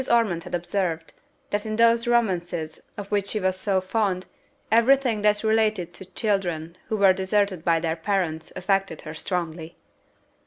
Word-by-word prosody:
Ormond 210 -8 +2
had - - -3
observed, 170 -2 -2 0.4
that 205 0 0
in 215 -1 -3
those 230 +1 +4
romances, 175 -9 0 0.2
of 205 0 -7
which 200 -1 +1
she 215 - 0
was 185 -1 0
so 190 0 0
fond, 185 -1 -1 0.5
every 235 +4 +6
thing 240 -6 -1
that 210 0 +2
related 215 -5 +1
to 190 - -10
children 180 -4 -2
who 220 - -1
were 195 -2 +6
deserted 190 -2 0
by 165 -1 +3
their 160 -1 -1
parents 165 -2 -2
affected 195 -3 0
her 155 - -8
strongly. 165 -1 -4
190 Hz, 160 wpm, -25 LUFS, 170-215 Hz, 0.5 s, every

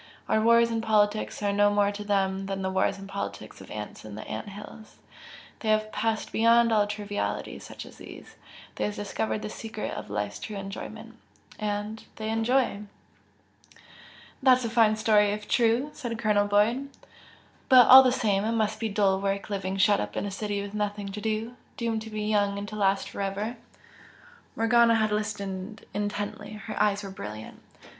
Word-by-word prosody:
Our 220 - +2
wars 235 +1 +5
and 225 -1 -1
politics 215 -1 +1
are 200 0 +1
no 205 0 +4
more 205 0 +2
to 205 0 -6
them 195 -1 0
than 195 -1 -3
the 190 - -1
wars 190 - +1
and 195 0 -9
politics 200 0 -6
of - - -12
ants 105 -1 -7
in 105 -1 -9
ant 110 - -6
hills, 210 +2 -11 0.6
they 220 - -3
have 215 0 +2
passed 225 -1 -1
beyond 230 +1 +4
all 210 -1 +3
trivialities 205 0 -4
such - - -9
as - - -14
these. - - -12 0.4
They - - 0
have 210 - -3
discovered 210 +1 -3
the - - -4
secret 220 -1 -5
of - - -7
life's 105 0 -3
true 215 - -6
enjoyment 195 0 -8 0.4
and 210 +1 -3
they 220 0 -4
enjoy!" 225 -1 +1 1.6
"That's 255 -2 +5
a 225 - -3
fine 225 -2 +4
story 210 -1 +4
if 210 0 -6
true!" 240 +5 +2
said 235 -4 -5
Colonel 210 -2 +2
Boyd 225 +7 +2 0.8
"But 255 -3 +9
all 260 +1 +12
the 255 -1 +3
same, 205 -6 +1
it 225 +2 0
must 215 -1 0
be 225 -1 -1
dull 195 -2 +2
work 200 +1 -2
living 190 -1 -2
shut 205 +1 +4
up - - -4
in - - -1
a 200 - -4
city 205 0 -3
with 200 0 -8
nothing 205 -1 -2
to 210 +2 -6
do, 220 +2 -2 0.2
doomed 230 -2 -1
to 220 - -8
be 215 -1 -4
young 205 -1 +1
and 200 0 -5
to 215 - -7
last 195 -1 +1
for - - -5
ever!" 200 +4 -2 1.0
Morgana 230 +1 +4
had 215 -1 +1
listened 205 -1 -4
intently, 205 0 -4
her 215 +1 -5
eyes 205 0 +2
were 195 - -6
brilliant. 110 - -8
210 Hz, 180 wpm, -27 LUFS, 200-225 Hz, 1.6 s, all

